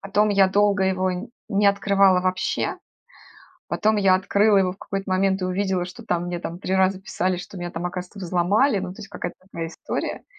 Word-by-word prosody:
Потом 205 +2 +1
я 195 -2 +4
долго 200 0 +2
его 185 0 +1 0.4
не 205 -1 +2
открывала 200 -2 +4
вообще. 185 0 -1 0.9
Потом 215 0 +1
я 195 -2 +4
открыла 200 +2 +3
его 185 -1 +2
в - - -15
какой-то 195 -1 -5
момент 190 +1 +2
и 185 - -1
увидела, 185 -1 -1
что 230 +6 -11
там, 175 -4 -1
мне 175 0 -3
там 170 0 -6
3 190 0 -2
раза 190 0 +2
писали, 185 -1 -1
что 185 +2 -9
меня 175 0 -5
там, 170 +2 -4
оказывается, 180 +2 -7
взломали. 195 +7 +2
Ну, 180 - -4
то - - -16
есть, 205 - -9
какая-то - - -6
такая 170 -3 -6
история. - - -5
190 Hz, 195 wpm, -23 LUFS, 180-200 Hz, 0.9 s, я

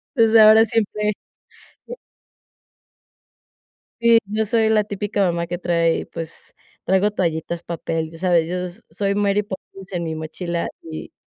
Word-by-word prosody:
Desde 225 -2 +5
ahora, 215 +1 +8
siempre 210 -1 0 0.8
e - - -6 2.1
Sí, 235 0 +6
yo 215 +2 -1
soy 220 0 +2
la 220 -1 +3
típica 205 0 -1
mamá 170 -1 -1
que 175 +1 -4
trae 170 -2 +1
pues 165 0 -9 0.3
traigo 190 +3 +2
toallitas, 170 -2 -2
papel. 165 -1 -3
Ya 165 - -12
sabes, 170 -2 +2
yo 180 - -2
s 180 +5 -9
soy 200 -1 -1
Mary 205 0 +1
Poppins, 195 -1 -10
en 175 -2 -2
mi 160 -1 -3
mochila 170 +2 -4
y 160 -1 -8
190 Hz, 145 wpm, -21 LUFS, 170-210 Hz, 2.1 s, ahora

